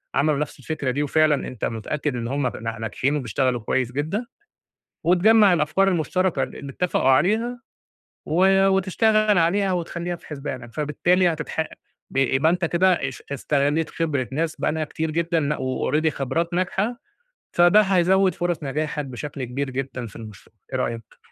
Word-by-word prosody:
عملوا 150 Hz, -1 st, +2 dB
نَفْس 150 Hz, -1 st, -4 dB
الفكرة 140 Hz, -1 st, -2 dB
دي 145 Hz, +3 st, -1 dB
وفعلًا 150 Hz, -1 st, +2 dB
أنت 125 Hz, -, -4 dB
متأكد 135 Hz, +5 st, -3 dB
إن 115 Hz, -1 st, -3 dB
هم 140 Hz, +1 st, 0 dB
ن 115 Hz, -, -6 dB, 0.2 s
ناجحين 130 Hz, +6 st, -1 dB
وبيشتغلوا 125 Hz, -1 st, 0 dB
كويس 125 Hz, +3 st, -1 dB
جدًا 155 Hz, -, -2 dB, 0.8 s
وتجمّع 200 Hz, +3 st, +5 dB
الأفكار 175 Hz, +4 st, +2 dB
المُشتركة 175 Hz, -3 st, 0 dB
ل 130 Hz, -, -6 dB
اللي 140 Hz, -1 st, -7 dB
اتّفقوا 175 Hz, -3 st, 0 dB
عليها 225 Hz, -, +2 dB, 0.7 s
و 190 Hz, +4 st, +4 dB
وتشتغل 210 Hz, +2 st, +3 dB
عليها 190 Hz, +4 st, +2 dB
وتخلّيها 175 Hz, 0 st, -3 dB
في -, -, -19 dB
حسبانك، 130 Hz, -5 st, -7 dB
فبالتالي 175 Hz, +5 st, +2 dB
هتتح 155 Hz, 0 st, -4 dB, 0.5 s
ب -, -, -9 dB
يبقى 135 Hz, +3 st, +3 dB
أنت 180 Hz, 0 st, -1 dB
كده 175 Hz, +3 st, +3 dB, 0.2 s
اش 130 Hz, -, -9 dB
استغلّيت 145 Hz, +3 st, 0 dB
خبرة 145 Hz, -7 st, -1 dB
ناس 160 Hz, +3 st, -1 dB
بقى -, -, +1 dB
لها 160 Hz, 0 st, -1 dB
كتير 160 Hz, +1 st, -3 dB
جدًا 165 Hz, +1 st, 0 dB
لأ 150 Hz, 0 st, 0 dB
وalready 135 Hz, +4 st, 0 dB
خبرات 165 Hz, +4 st, -2 dB
ناجحة، 195 Hz, +6 st, 0 dB, 0.6 s
فده 175 Hz, +4 st, +6 dB
هيزوِّد 190 Hz, 0 st, +3 dB
فُرَص 175 Hz, -2 st, -2 dB
نجاحك 150 Hz, +1 st, -2 dB
بشكل 135 Hz, +1 st, -6 dB
كبير 135 Hz, +3 st, -3 dB
جدًا 130 Hz, -1 st, -4 dB
في 105 Hz, -, -12 dB
المشروع، 110 Hz, -3 st, -12 dB, 0.2 s
إيه -, -, -1 dB
رأيك؟ 115 Hz, -2 st, -4 dB
155 Hz, 160 wpm, -23 LUFS, 135-180 Hz, 0.8 s, فده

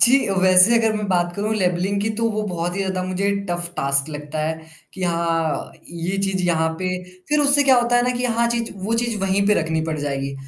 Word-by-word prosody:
जी, 255 Hz, +1 st, +4 dB
वैसे 185 Hz, +4 st, +6 dB
अगर 225 Hz, -1 st, +2 dB
मैं 210 Hz, -, -3 dB
बात 175 Hz, -2 st, +1 dB
करूँ 210 Hz, +2 st, -1 dB
लेबलिंग 190 Hz, 0 st, 0 dB
की, 210 Hz, -, 0 dB
तो 225 Hz, +1 st, -2 dB
वो 215 Hz, 0 st, -2 dB
बहुत 175 Hz, -3 st, -3 dB
ही -, -, -3 dB
ज़्यादा 190 Hz, -1 st, -2 dB
मुझे 185 Hz, +2 st, -1 dB, 0.2 s
टफ़ 175 Hz, 0 st, -3 dB
टास्क 140 Hz, +1 st, 0 dB
लगता 150 Hz, +1 st, -6 dB
है, 160 Hz, 0 st, -3 dB, 0.3 s
कि 190 Hz, -, -7 dB
हाँ, 165 Hz, -3 st, -1 dB, 0.2 s
ये 170 Hz, +3 st, -3 dB
चीज़ 190 Hz, -1 st, -1 dB
यहाँ 160 Hz, -2 st, +2 dB
पे 185 Hz, -, -2 dB, 0.4 s
फ़िर 300 Hz, 0 st, +2 dB
उससे 285 Hz, 0 st, +4 dB
क्या 265 Hz, -2 st, +5 dB
होता 240 Hz, 0 st, +2 dB
है 245 Hz, -, +3 dB
ना, 250 Hz, -, +1 dB
कि 250 Hz, -, -2 dB
हाँ 235 Hz, -1 st, +1 dB
चीज़ 235 Hz, -1 st, -2 dB
वो 225 Hz, +3 st, 0 dB
चीज़ 235 Hz, -3 st, -2 dB
वही 195 Hz, +1 st, +1 dB
पे 210 Hz, -, +4 dB
रखनी 160 Hz, 0 st, -1 dB
पड़ 160 Hz, -1 st, -2 dB
जाएगी। 140 Hz, -1 st, -3 dB
185 Hz, 230 wpm, -21 LUFS, 165-220 Hz, 0.4 s, वैसे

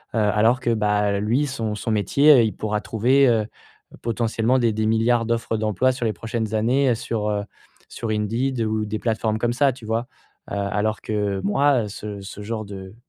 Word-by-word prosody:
heu, 110 Hz, -, +2 dB
alors 110 Hz, +4 st, +3 dB
que 120 Hz, -, 0 dB
bah, 105 Hz, -1 st, +1 dB
lui 120 Hz, +8 st, +1 dB
son 115 Hz, -5 st, -3 dB
son 110 Hz, +2 st, -3 dB
métier, 110 Hz, +9 st, +4 dB
heu, 120 Hz, -4 st, +6 dB
il 110 Hz, -, 0 dB
pourra 105 Hz, -1 st, -2 dB
trouver, 130 Hz, +5 st, +3 dB
heu, 110 Hz, -3 st, +2 dB, 0.6 s
potentiellement 115 Hz, +1 st, 0 dB
des 115 Hz, -2 st, +2 dB
des 110 Hz, 0 st, -1 dB
milliards 115 Hz, +1 st, +2 dB
d'offres 115 Hz, -1 st, -1 dB
d'emploi 110 Hz, +4 st, +1 dB
sur 125 Hz, -2 st, -4 dB
les 110 Hz, -, 0 dB
prochaines 110 Hz, -1 st, -3 dB
années, 125 Hz, +3 st, +2 dB
sur, 110 Hz, -2 st, -3 dB
heu 105 Hz, -1 st, -1 dB, 0.5 s
sur 115 Hz, -, -5 dB
Indeed 115 Hz, +4 st, -1 dB
ou 110 Hz, -1 st, 0 dB
des 105 Hz, 0 st, -4 dB
plateformes 110 Hz, -1 st, -1 dB
comme 120 Hz, +1 st, 0 dB
ça, 135 Hz, 0 st, +2 dB
tu 120 Hz, -3 st, -13 dB
vois? 115 Hz, +2 st, -2 dB, 0.4 s
Heu, -, -, -2 dB
alors 105 Hz, +2 st, -1 dB
que 105 Hz, -2 st, -2 dB
moi, 125 Hz, +2 st, +2 dB
ce 100 Hz, 0 st, -7 dB
ce 95 Hz, +1 st, -9 dB
genre 110 Hz, +1 st, -4 dB
de 95 Hz, -1 st, -9 dB
110 Hz, 195 wpm, -23 LUFS, 105-120 Hz, 0.6 s, heu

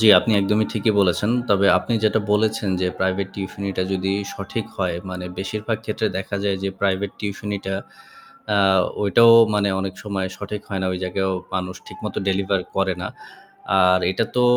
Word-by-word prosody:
জি 110 Hz, -, +5 dB
আপনি 110 Hz, -, +1 dB
একদমই 105 Hz, +2 st, +2 dB
ঠিকই 110 Hz, 0 st, +1 dB
বলেছেন 100 Hz, +3 st, +2 dB, 0.2 s
তবে 100 Hz, -1 st, +4 dB
আপনি 90 Hz, +6 st, -4 dB
যেটা 110 Hz, +1 st, +3 dB
বলেছেন 110 Hz, 0 st, +1 dB
যে 90 Hz, -, +1 dB
প্রাইভেট 95 Hz, +1 st, 0 dB
টিউশানিটা 95 Hz, -1 st, -3 dB
যদি 95 Hz, 0 st, 0 dB, 0.2 s
সঠিক 100 Hz, +3 st, -5 dB
হয় 90 Hz, -3 st, -1 dB
মানে 90 Hz, 0 st, -5 dB
বেশিরভাগ 105 Hz, +3 st, -2 dB
ক্ষেত্রে 110 Hz, 0 st, -1 dB
দেখা 100 Hz, +1 st, -4 dB
যায় 100 Hz, -1 st, +1 dB
যে 100 Hz, -, 0 dB
প্রাইভেট 100 Hz, 0 st, 0 dB
টিউশানিটা 100 Hz, -1 st, -4 dB, 0.8 s
আ -, -, +4 dB, 0.4 s
ওইটাও 115 Hz, +4 st, +6 dB, 0.2 s
মানে 100 Hz, -1 st, +2 dB
অনেক 95 Hz, -1 st, -4 dB
সময় 100 Hz, -2 st, -2 dB
সঠিক 105 Hz, 0 st, -6 dB
হয় 95 Hz, -2 st, -3 dB
না -, -, 0 dB
ওই 90 Hz, -, -3 dB
জায়গায়ও 95 Hz, +1 st, -1 dB, 0.2 s
মানুষ 90 Hz, 0 st, -3 dB
ঠিকমতো -, -, -6 dB
ডেলিভার 95 Hz, 0 st, +1 dB, 0.2 s
করে 95 Hz, -1 st, +1 dB
না। 90 Hz, -, -3 dB, 0.7 s
আর 90 Hz, 0 st, +5 dB
এটা 100 Hz, +5 st, 0 dB
তো 125 Hz, -, +4 dB
100 Hz, 170 wpm, -22 LUFS, 95-105 Hz, 0.8 s, ওইটাও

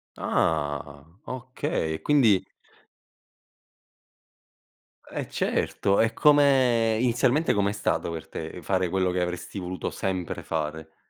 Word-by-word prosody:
Ah 70 Hz, -1 st, -1 dB, 0.2 s
okay, 125 Hz, -11 st, -3 dB
quindi 110 Hz, -10 st, +3 dB, 2.6 s
Eh -, -, -4 dB
certo 100 Hz, 0 st, 0 dB
e 110 Hz, 0 st, +2 dB
come 130 Hz, -6 st, +4 dB
inizialmente 125 Hz, +5 st, +2 dB
com'è 100 Hz, 0 st, +1 dB
stato 105 Hz, -, -1 dB
per 80 Hz, -2 st, -6 dB
te 80 Hz, +2 st, -7 dB
fare 95 Hz, +2 st, 0 dB
quello 95 Hz, 0 st, +1 dB
che 90 Hz, 0 st, -1 dB
avresti 90 Hz, +3 st, -4 dB
voluto 90 Hz, -1 st, -4 dB
sempre 95 Hz, -3 st, -3 dB
fare? 80 Hz, 0 st, -4 dB
95 Hz, 105 wpm, -26 LUFS, 80-120 Hz, 2.6 s, come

